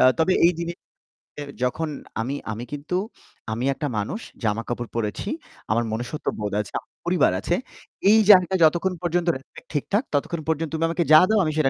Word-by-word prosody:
আ - - +5 0.2
তবে 165 +3 +3
এই 175 - +4
জিনিস 170 0 -4 0.7
এ - - -3 0.2
যখন 155 +6 -1 0.3
আমি 130 +5 -2 0.2
আমি 110 +3 -5
কিন্তু, 145 +5 -4 0.6
আমি 115 +4 -2
একটা 145 +2 -3
মানুষ 105 - -2 0.2
জামাকাপড় 115 +2 -2
পড়েছি। 115 - -2 0.4
আমার 115 +2 +2
মনুষ্যত্ববোধ 110 -3 -3
আছে, - - -10
আমার - - -24
পরিবার 175 - +3
আছে। 170 - 0 0.5
এই 220 - +7
জায়গায় 185 -1 +5
যতক্ষণ 170 +4 +3
পর্যন্ত 175 0 0
রেসপেক্ট 135 +1 -12
ঠিকঠাক, 200 - 0
ততক্ষণ 160 +3 -1
পর্যন্ত 160 0 0
তুমি 160 0 -1
আমাকে 170 +1 0
যা 155 - +10
দাও 220 -1 +4
আমি 155 - 0
সেটা 150 -3 +3
155 Hz, 175 wpm, -24 LUFS, 120-175 Hz, 0.7 s, যা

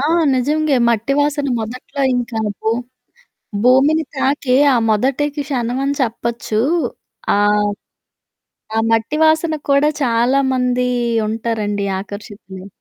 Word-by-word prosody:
ఆ! - - -1 0.3
నిజంగే 295 +2 +1
మట్టి 235 +3 0
వాసన 290 -1 0
మొదట్లో 255 +5 -5
ఇంకా 240 -2 -3
అబ్బో! 215 +2 -3 0.9
భూమిని 280 +6 +4
తాకే 270 -1 0 0.2
ఆ - - +3
మొదటి 260 +7 +1
క్షణమని 270 -1 -1
చెప్పొచ్చు. 230 -2 -2 0.8
ఆహ్, 205 0 +2 1.1
ఆ 225 - +2
మట్టి 225 +7 +1
వాసన 315 +1 +2 0.2
కూడా 280 +2 +4
చాలామంది 250 +1 +1 0.4
ఉంటారండి 215 -2 -2 0.2
ఆకర్షితులై. 200 -2 -10
250 Hz, 100 wpm, -18 LUFS, 220-280 Hz, 1.1 s, భూమిని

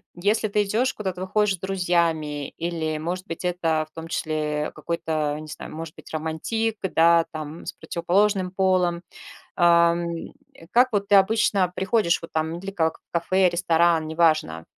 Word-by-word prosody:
если 205 +5 +1
ты 210 0 +1
идешь, 225 +6 0
куда-то 190 -4 -4
выходишь 200 +2 +1
с - - -18
друзьями 170 -5 0
или, 165 -2 -3
может 180 +5 -4
быть, 165 - -6
это 165 -3 0
в - - -68
том 165 0 -8
числе 150 -2 -2
какой-то, 155 -3 -2
не 155 - -10
знаю, 155 0 -8
может 160 0 -7
быть, - - -14
романтик, 160 +9 -2 0.2
да, 165 0 +5
там 155 +1 -7
с - - -5
противоположным 185 +2 0
полом, 185 -2 +1 0.6
а, 170 -1 +5
м. 170 -1 -4 0.4
Как 250 +2 +5
вот 200 -1 0
ты 205 - +6
обычно 195 -1 +3
приходишь 190 -3 +1
вот 165 - -10
там 160 +1 -2
или 195 +2 -6
как, 160 -4 -1
в - - -61
кафе, 185 +2 +2
ресторан, 170 -2 +2
неважно. 155 - +1
170 Hz, 160 wpm, -24 LUFS, 160-190 Hz, 0.6 s, ты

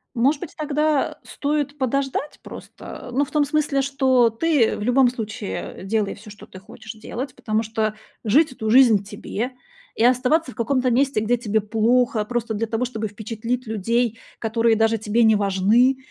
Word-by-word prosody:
Может 275 +5 +2
быть, 345 - -8
тогда, 300 -1 0
э, - - -20
стоит 290 0 -2
подождать 275 +2 -2
просто? 255 - -10
Ну, 275 +4 +1
в 280 - -16
том 300 -1 +2
смысле, 290 -1 0
что 260 -3 +3
ты, 280 0 +1
в - - -7
любом 250 +3 +4
случае, 215 -6 -6
делай 205 +1 -1
всё, 210 +1 -13
что 205 - -13
ты 185 - -12
хочешь 220 +2 -11
делать, 245 +4 -7
потому 215 0 -1
что 220 -1 -1 0.3
жить 285 +8 +3
эту 225 -4 -4
жизнь 230 -4 +6
тебе, 210 +4 -5 0.4
и 225 - 0
оставаться 255 +4 +2
в - - -16
каком-то 255 +1 0
месте, 270 0 +2
где 240 +3 +1
тебе 220 -2 0
плохо, 225 +2 +1
просто 235 -1 -2
для 220 +2 -2
того, 230 +3 -1
чтобы 225 -3 -4
впечатлить 225 +4 -4
людей, 225 +2 -1 0.2
которые 230 0 +1
даже 225 +1 +2
тебе 220 +2 +1
не 220 -1 +5
важны, 205 +6 +3
235 Hz, 175 wpm, -22 LUFS, 220-265 Hz, 0.4 s, жизнь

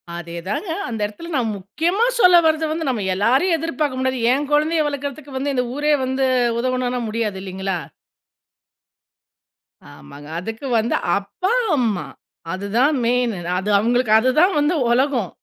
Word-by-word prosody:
அதேதாங்க. 175 - -5 0.2
அந்த 225 -2 -4
இடத்தில 215 +12 -8
நான் 225 -3 0
முக்கியமா 340 - 0
சொல்ல 360 -3 +7
வரது 315 0 +2
வந்து, 320 -2 -2
நம்ம 225 -6 -1
எல்லாரையும் 265 - +2
எதிர்பாக்க 305 -5 -2
முடியாது. 260 -1 -1
என் 285 +1 -2
குழந்தையை 310 +2 +2
வளர்க்குறதுக்கு 285 -1 -6
வந்து, 280 +1 -1
இந்த 250 - +1
ஊரே 295 +1 +2
வந்து 265 +1 0 0.3
உதவணும்ன்னா, 250 0 -1
முடியாது 215 -3 -2
இல்லைங்களா? 190 -1 -3 2.2
ஆமாங்க. 145 - -13
அதுக்கு 225 +8 -7
வந்து 225 +2 0 0.2
அப்பா, 365 - -2 0.2
அம்மா. 220 -7 0 0.5
அதுதான் 225 +10 +1
மெயினு. 240 -4 +1 0.2
அது 195 +3 -2
அவங்களுக்கு 240 +1 +1
அதுதான் 305 - +3
வந்து 300 +4 +2 0.2
உலகம். 250 - +1
255 Hz, 130 wpm, -20 LUFS, 215-295 Hz, 2.2 s, சொல்ல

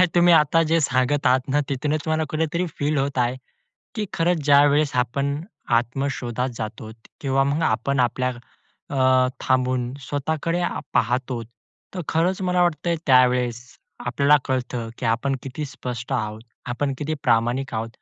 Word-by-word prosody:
नाही 185 - +6
तुम्ही 175 0 +6
आता 160 +1 +4
जे 165 +1 +2
सांगत 140 0 +1
आहात 130 +1 +5
ना, 145 +2 +2
तिथूनच 145 +3 -1
मला 160 0 +1
कुठेतरी 160 +3 -1
फील 145 0 0
होत 135 0 -1
आहे, 125 +1 +1 0.6
की 215 - -2
खरंच 170 -1 +1
ज्यावेळेस 145 0 +4
आपण 140 +3 0 0.4
आत्मशोधात 125 0 -2
जातो 110 -1 -6 0.3
किंवा 135 -1 +1
मग 145 +4 0
आपण 140 -1 +1
आपल्या 125 +1 +1 0.6
अ, 130 -2 +3
थांबून 130 -1 0
स्वतःकडे 155 +5 -2
आ, 175 - -1 0.2
पाहतो 120 +1 0 0.5
तर 185 - -3
खरंच 175 +4 +1
मला 180 0 +3
वाटत 170 -2 0
आहे 170 -1 +2
त्यावेळेस, 125 -2 +4 0.5
आपल्याला 140 +4 +4
कळतं 125 -3 -2
की 120 - -2
आपण 130 +5 +1
किती 135 +3 -5
स्पष्ट 125 -3 -6
आहोत, 105 0 -2 0.3
आपण 140 +3 -1
किती 155 +1 -2
प्रामाणिक 120 +2 +1
आहोत 110 +1 -2
135 Hz, 150 wpm, -23 LUFS, 125-150 Hz, 0.6 s, नाही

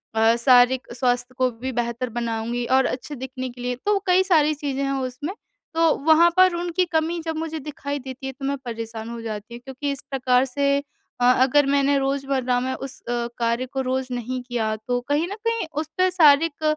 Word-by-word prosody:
अ, 225 +1 +4
शारीरिक 250 +1 +4
स्वास्थ्य 245 0 0
को 255 -1 +2
भी 250 +3 -5
बेहतर 235 +1 -2
बनाऊँगी 235 +1 -2
और 260 +2 +3
अच्छे 285 +3 -4
दिखने 260 0 -5
के 245 0 -11
लिए, 250 0 -2
तो 410 +12 0
वो 395 - +2
कई 365 +1 +5
सारी 310 -5 +3
चीज़ें 275 -1 -3
हैं 275 - -1
उसमें 265 +6 -4 0.4
तो 330 -1 +4
वहाँ 325 +2 +6
पर 370 -1 +6
उनकी 350 +1 0
कमी 330 0 -1
जब 320 -1 -3
मुझे 320 0 -4
दिखाई 285 0 -5
देती 265 +1 -8
है - - -3
तो 270 +1 -7
मैं 280 0 -1
परेशान 225 -1 -6
हो 235 -1 -6
जाती 215 0 -6
हूँ। 240 - -9
क्योंकि 270 +2 -4
इस 280 0 -5
प्रकार 255 -1 +2
से 280 +2 +1 0.4
अ 245 +1 +6
अगर 285 +2 +4
मैंने 280 0 +2
रोज़मर्रा 270 -2 0
में 260 +1 -2
उस 270 -1 -7
अ, 240 0 -2
कार्य 235 +2 0
को 265 +1 -3
रोज़ 260 0 -1
नहीं 250 +1 -3
किया 230 -3 -2
तो 245 0 +1
कहीं 305 +4 +1
न 405 - -5
कहीं 460 -7 0
उसपे 365 +4 0
शारीरिक 315 -2 +4
265 Hz, 205 wpm, -23 LUFS, 245-295 Hz, 0.4 s, वहाँ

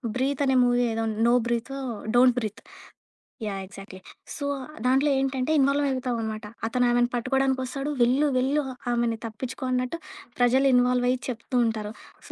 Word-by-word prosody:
'Breath' 270 +2 0
అనే 265 -1 +2
movie 245 0 +2
ఉన్ 230 - -1
ఏదో, 225 - -1 0.2
no 240 - +4
బ్రీతో, 235 +3 -2 0.4
'don't 250 0 +6
breathe' 215 -3 -5 0.8
yeah! 195 -2 -3
Exactly. 195 0 -11 0.4
So, 285 - -4 0.4
దాంట్లో 270 +3 +3
ఏంటంటే, 270 +1 -1
ఇన్వాల్వ్ 280 +1 +2
అవుతాం 255 -2 -2
అన్నమాట. 220 0 -4 0.2
అతను 245 +2 +1
ఆమెను 240 0 +2
పట్టుకోవడానికొస్తాడు. 265 +2 -1
వెళ్ళు 260 +5 +3
వెళ్ళు, 275 +4 +1 0.3
ఆమెను 235 -1 0
తప్పించుకో 240 +4 -6
అన్నట్టు 255 +6 -1 0.4
ప్రజలు 255 +3 +4
ఇన్వాల్వ్ 250 0 +3
అయ్యి 255 - -1
చెప్తుంటారు. 230 -3 -1 0.3
సో, - - -11
250 Hz, 145 wpm, -26 LUFS, 235-265 Hz, 0.8 s, don't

